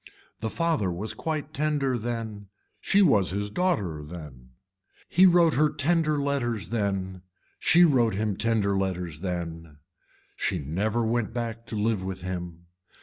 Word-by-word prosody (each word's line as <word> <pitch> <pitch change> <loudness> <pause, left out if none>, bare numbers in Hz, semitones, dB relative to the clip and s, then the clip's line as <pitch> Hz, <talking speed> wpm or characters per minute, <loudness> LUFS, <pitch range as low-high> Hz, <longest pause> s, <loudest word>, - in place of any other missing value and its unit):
The 110 - -2
father 160 - 0
was 100 +6 -3
quite 155 -2 -4
tender 145 -3 0
then, 110 -3 -4 0.3
she 200 +1 +3
was 105 - +4
his 100 +2 -3
daughter 105 - 0
then. 75 -6 -10 0.5
He 185 +2 +6
wrote 170 -3 +5
her 150 +2 +3
tender 155 +1 +1
letters 120 -10 -1
then, 95 -4 -2 0.4
she 175 +1 +6
wrote 120 - +3
him 105 0 -1
tender 105 -2 +1
letters 90 -5 -2
then, 85 -4 -5 0.6
she - - -1
never 105 - -1
went 115 -1 -1
back 115 -1 -4
to - - -4
live 105 -2 0
with 95 -1 -5
him. 90 -2 -6
110 Hz, 145 wpm, -27 LUFS, 90-140 Hz, 0.6 s, He